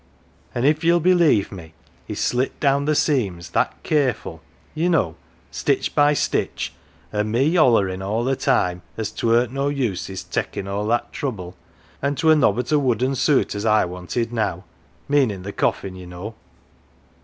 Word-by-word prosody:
" - - -33
An' 120 +1 0
if 150 +3 +2
ye'll 170 +1 +4
believe 170 - +3
me, 80 -4 -10 0.3
he - - -5
slit 125 +2 -1
down 140 0 +2
the 155 0 +2
seams, 95 - 0
that - - -1
careful, 145 -5 0 0.3
ye 165 +3 0
know, 95 - +1 0.4
stitch - - 0
by 145 0 +4
stitch, - - -1 0.4
an' 105 0 0
me 135 +9 +2
hollerin' 105 - +3
all 110 +4 -1
the 135 +2 +1
time, 90 -11 +1 0.2
as 110 -2 -3
't - - -3
weren't 120 +2 +3
no 140 +1 0
use 125 -10 -1
his 95 -1 -6
takin' 95 - -3
all 100 +2 -2
that 120 +1 0
trouble, 95 -10 -4 0.5
an' 140 +1 0
't 160 - -3
were 160 0 +7
nobbut 125 -3 +1
a 150 - +4
wooden 130 0 +1
suit 140 +1 +2
as 100 0 -4
I 110 -2 +3
wanted 90 +7 -4
now 110 -2 -1 0.4
meanin' 130 -10 +1
the 100 +1 -6
coffin, 95 -1 -1
ye 90 -1 -10
know. 90 +5 -7
120 Hz, 175 wpm, -22 LUFS, 100-145 Hz, 0.5 s, were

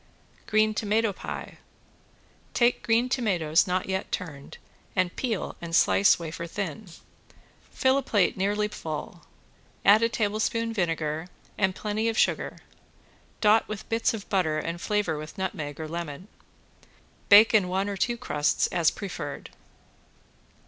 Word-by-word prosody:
~GREEN 215 0 +3
TOMATO 215 0 +1
PIE~ - - -7 1.0
Take 240 0 +3
green 230 +2 +2
tomatoes 185 - +1
not 180 0 -1
yet 190 0 -3
turned 150 -7 -6 0.4
and 185 -2 0
peel 230 -7 -2
and 165 -1 -3
slice 200 - +5
wafer 170 0 -6
thin. 195 +2 -5 0.8
Fill 265 +1 +2
a - - -2
plate 205 -8 +1
nearly 205 +2 0
full, 165 -3 -6 0.6
add 205 +3 +7
a 230 - +3
tablespoonful 225 +1 -1
vinegar 165 -4 -1 0.3
and 190 -2 +1
plenty 215 +2 -1
of 225 - -3
sugar, - - +1 0.8
dot 215 +1 +4
with 215 -2 -7
bits 225 0 +1
of 205 - -9
butter 170 -6 +1
and 170 +2 -4
flavor 205 -7 0
with 155 +1 -9
nutmeg 155 -6 -4
or 160 - -4
lemon. 170 +2 -6 1.0
Bake 210 +2 +8
in 205 -4 +4
one 190 +2 -1
or 200 - -3
two 240 +4 0
crusts 150 -11 0
as 165 -3 +3
preferred. 180 -8 -6
195 Hz, 135 wpm, -26 LUFS, 170-215 Hz, 1.0 s, Bake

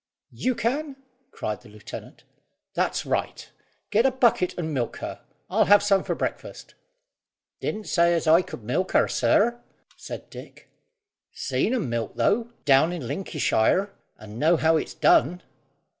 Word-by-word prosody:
"You 255 0 -1
can?" 275 +6 -2 0.3
cried 105 - -5
the 120 - -16
lieutenant, 105 0 -11 0.5
"that's - - -1
right; - - -2 0.4
get 215 +2 +4
a 270 - +4
bucket 240 -8 +1
and 160 -3 -3
milk 120 -4 -2
her. - - -7 0.3
I'll - - +2
have 205 0 +6
some 195 -2 +3
for - - -2
breakfast." - - -5 0.9
"Didn't 215 0 -3
say 170 -1 +3
as 165 - -1
I 160 +3 +6
could 125 - -9
milk, 180 - -1 0.2
sir," 240 +3 +2 0.3
said - - -9
Dick. - - -12 0.6
"Seen 255 - -1
'em 225 - -1
milk, 115 -2 -3
though, 225 - +1
down 145 +3 +5
in 165 -9 -5
Linkyshire, 185 - 0 0.3
and 110 +1 -10
know 165 +3 +4
how 160 +1 +3
it's 155 - -2
done." 175 +8 +3
175 Hz, 145 wpm, -25 LUFS, 135-215 Hz, 0.9 s, have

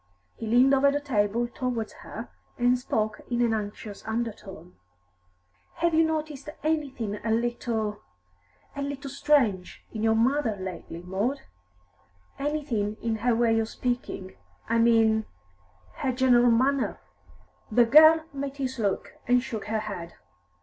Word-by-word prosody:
He 225 - -7
leaned 250 +4 +5
over 275 +1 +5
the 285 +1 0
table 235 -4 0
towards 240 -2 -3
her, - - -8 0.3
and 245 +1 +3
spoke 215 -4 -2
in 240 -1 -1
an 230 -1 +2
anxious 210 -1 -5
undertone. 220 - -5 1.0
"Have 340 0 +1
you 320 +1 +5
noticed 310 -3 -3
anything 270 -10 -2
a 225 - -2
little 225 -2 -1 0.7
a 280 - -4
little 280 0 -5
strange 250 -11 +1
in 220 - -5
your 220 0 +3
mother 245 0 +2
lately, 175 -2 -7
Maud? 205 +10 -2 1.0
Anything 275 -8 -2
in 225 -1 0
her 235 +2 +1
way 225 -1 +3
of 220 0 -1
speaking, 240 -7 -4 0.3
I 230 +1 +2
mean 225 -1 +4 0.7
her 260 - 0
general 245 -1 +4
manner?" 260 +4 +2 0.7
The 240 +2 +5
girl 315 +5 +7
met 280 0 -5
his 260 -2 -3
look, 200 -3 -2
and 245 0 +4
shook 220 -5 -5
her 215 +1 -1
head. 180 -6 -7
235 Hz, 135 wpm, -27 LUFS, 220-275 Hz, 1.0 s, girl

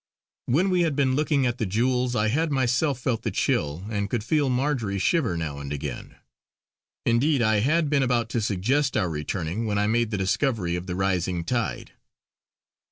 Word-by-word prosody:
When 175 +10 +2
we 180 -1 +3
had 160 -4 +1
been 135 -2 +2
looking 145 -2 +1
at 120 0 -1
the 110 - 0
jewels, 125 +4 0
I 105 -1 +2
had 160 +7 +1
myself 130 +1 +1
felt 120 -3 -1
the - - -2
chill, 75 +6 -1
and 100 -1 -2
could 120 -4 -2
feel 145 +3 +1
Marjory 125 -6 0
shiver 115 - +1
now 75 -3 -4
and 70 0 -6
again. 75 - -5 0.9
Indeed, 130 +3 +2
I 110 -1 +3
had 155 +8 +2
been 145 -1 +2
about 120 -3 +1
to 115 - -1
suggest 115 +8 0
our 90 -5 0
returning 85 +7 -3
when 105 -1 0
I 105 - +2
made 115 +1 +1
the 105 - -2
discovery 95 -2 0
of 90 +1 -5
the 90 - -3
rising 90 -2 0
tide. 120 +5 -2
115 Hz, 185 wpm, -25 LUFS, 95-135 Hz, 0.9 s, we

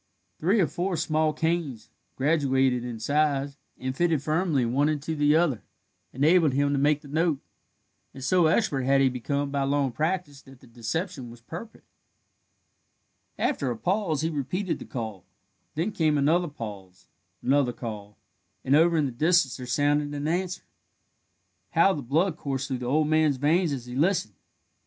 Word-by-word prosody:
Three 190 +8 +2
or 185 - +4
four 175 +4 -2
small 155 0 +1
canes, 160 -7 -2 0.2
graduated 135 -4 +2
in 120 -2 -5
size, 140 +2 0 0.2
and 130 0 -4
fitted 165 -3 +1
firmly 155 -4 +1
one 135 +6 +1
into 155 +1 -2
the 145 0 +3
other, 155 -10 +2 0.5
enabled 155 +2 +3
him 140 +1 +1
to 140 - +1
make 145 +1 +2
the - - -13
note, 160 +1 +1 0.7
and 135 - -10
so 175 +4 +3
expert 155 - +1
had 135 +2 +3
he 135 -1 +4
become 140 +3 -2
by 140 -1 -1
long 140 -1 +1
practice 155 -1 -2
that 135 -1 -16
the - - -18
deception 125 - -4
was 120 0 -12
perfect. 175 - -10 1.5
After 140 - 0
a 120 - -3
pause 180 - 0
he 160 +1 -1
repeated 165 +6 -2
the - - -8
call; 110 -7 -6 0.5
then 170 +8 -1
came 155 -5 +1
another 165 +5 +2
pause, 100 - -9 0.4
another 135 -1 +2
call, 105 -4 -8 0.5
and 135 - +4
over 165 +2 +4
in 150 - +2
the 135 - -2
distance 150 -1 +2
there 125 - -8
sounded 145 +2 +1
an 145 +1 -3
answer. 180 +2 -2 1.1
How 195 - +5
the 150 - -4
blood 155 +7 0
coursed 135 -3 -3
through 130 -2 -2
the 125 - -4
old 150 +4 +2
man's 155 -3 +2
veins 160 +5 +2
as 130 -4 -4
he 125 0 -8
listened! 155 - +1
145 Hz, 165 wpm, -26 LUFS, 130-165 Hz, 1.5 s, How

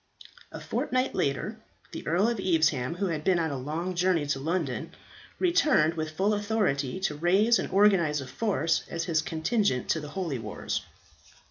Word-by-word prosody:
A - - -7
fortnight 255 +1 -1
later 175 +11 -1 0.3
the - - -7
Earl 180 +7 +2
of 235 -3 -1
Evesham, 160 -6 +1
who 200 +3 -1
had 155 -2 -3
been 185 0 +3
on 160 -2 0
a - - -3
long 155 +7 -3
journey 175 -3 +1
to 140 -1 -1
London, 160 -3 -2 0.4
returned 310 - +3
with 155 -1 -5
full 200 +3 +2
authority 205 - 0
to 170 - 0
raise 190 +9 +3
and - - -3
organize 185 -6 +3
a 135 - -5
force 165 - 0
as 165 -1 -3
his 165 -2 +1
contingent 160 - 0
to 160 - +2
the 150 -1 -7
holy 165 -9 -2
wars. 105 -2 -4
170 Hz, 170 wpm, -28 LUFS, 150-200 Hz, 0.4 s, been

